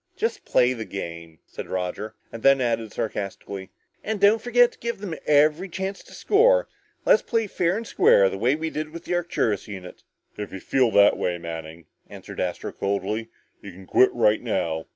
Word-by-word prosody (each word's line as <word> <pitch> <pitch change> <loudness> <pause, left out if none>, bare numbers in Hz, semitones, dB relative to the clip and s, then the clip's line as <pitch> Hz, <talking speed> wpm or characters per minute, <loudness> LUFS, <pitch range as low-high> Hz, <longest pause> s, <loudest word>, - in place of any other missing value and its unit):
"Just 455 - -2
play 125 +1 +3
the 115 -3 -5
game," 85 -5 -7
said - - -8
Roger. 95 +4 -4 0.2
And 115 - -8
then 135 +1 +5
added 115 -3 -1
sarcastically, 100 -2 -5 0.3
"And 215 -1 -2
don't 205 +3 +5
forget 245 0 +4
to - - -22
give 235 0 -3
them 195 -4 -6
every 150 +5 +3
chance 190 +2 -4
to - - -16
score. - - +3 0.4
Let's - - +5
play 230 -2 0
fair 180 -1 0
and 230 - -5
square, 100 - +5
the 95 - -4
way 125 +6 +2
we 160 +1 -4
did 155 0 -4
with 170 +2 -10
the - - -2
Arcturus 165 - -1
unit." 95 -3 -9 0.4
"If 105 -1 -6
you 95 - -6
feel 130 +4 +2
that 100 -2 +5
way, 90 -1 -1
Manning," 80 -1 -8 0.2
answered - - -10
Astro 90 -1 -3
coldly, 100 +3 -2 0.3
"you 100 - -9
can 95 +2 -13
quit 130 - +4
right 110 -3 +2
now! 80 -9 -2
115 Hz, 190 wpm, -24 LUFS, -, 0.4 s, then